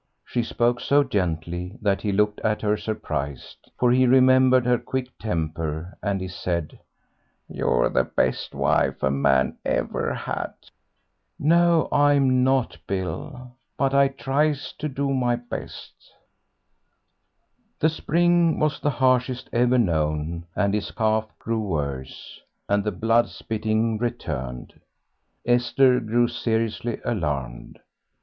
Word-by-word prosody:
She 120 - -1
spoke 120 +1 0
so 145 +3 +3
gently 90 - -3
that 100 -4 0
he 105 - -1
looked 105 +1 +1
at 105 0 -1
her 105 0 +2
surprised, 75 - -5
for 125 -1 +3
he 130 +1 +4
remembered 130 0 +5
her 125 -1 +2
quick 130 -1 -4
temper, 80 -3 -3
and 100 -2 -1
he 95 - -4
said, 85 -3 -4 0.7
"You're - - +1
the 65 - +1
best - - -1
wife - - +1
a 65 - +2
man 65 -1 +2
ever - - -1
had." - - -4 0.8
"No, 170 +1 +3
I'm 140 -3 +4
not, 130 -9 +1
Bill, 125 +8 -5 0.3
but 135 -1 +1
I 140 0 +5
tries 140 +2 -1
to 150 - -2
do 135 0 -1
my 125 -2 +1
best." 120 0 -8 1.9
The 155 - +4
spring 170 +1 +2
was 150 -1 0
the 145 - 0
harshest 130 -2 +1
ever 125 +1 +3
known, 80 -4 -1
and 100 -1 +1
his 105 -1 -1
cough 110 -1 0
grew 115 -1 -2
worse 70 -9 -5 0.3
and 100 0 +1
the 105 - -1
blood 115 +4 +2
spitting 110 0 -1
returned. 65 - -4 0.7
Esther 125 +1 +3
grew 120 +1 +1
seriously 115 0 -2
alarmed. 70 - -3
115 Hz, 125 wpm, -24 LUFS, 90-130 Hz, 1.9 s, remembered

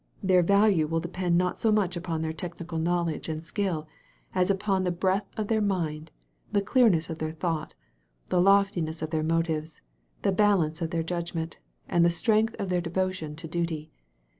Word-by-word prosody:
Their 185 -1 +5
value 200 -3 +4
will 165 +1 0
depend 175 +1 0
not 180 0 0
so 225 - +3
much 195 -4 +1
upon 165 -2 -3
their 160 0 -2
technical 170 0 -5
knowledge 170 -1 -1
and 155 0 -4
skill 170 -3 -2 0.5
as 185 0 +2
upon 195 -1 +1
the 180 - +1
breadth 190 +3 0
of 215 -2 -1
their 220 0 +1
mind, 165 -6 -1 0.4
the 200 - +2
clear 245 +3 +5
ijiess 165 -3 0
of 160 - -6
their 155 0 -3
thought, 160 -1 -3 0.5
the 180 - +3
loftiness 190 -5 +2
of 155 - -4
their 160 -1 0
motives, 160 -1 -1 0.4
the - - +3
balance 185 -5 +2
of 165 - -1
their 165 -1 -1
judgment, 170 -1 -4 0.3
and 170 - +3
the 170 - +5
strength 215 +6 +2
of 195 - -3
their 180 -1 +1
devotion 175 -3 -2
to 165 +1 -7
duty. 160 -2 -3
175 Hz, 185 wpm, -27 LUFS, 160-190 Hz, 0.5 s, Their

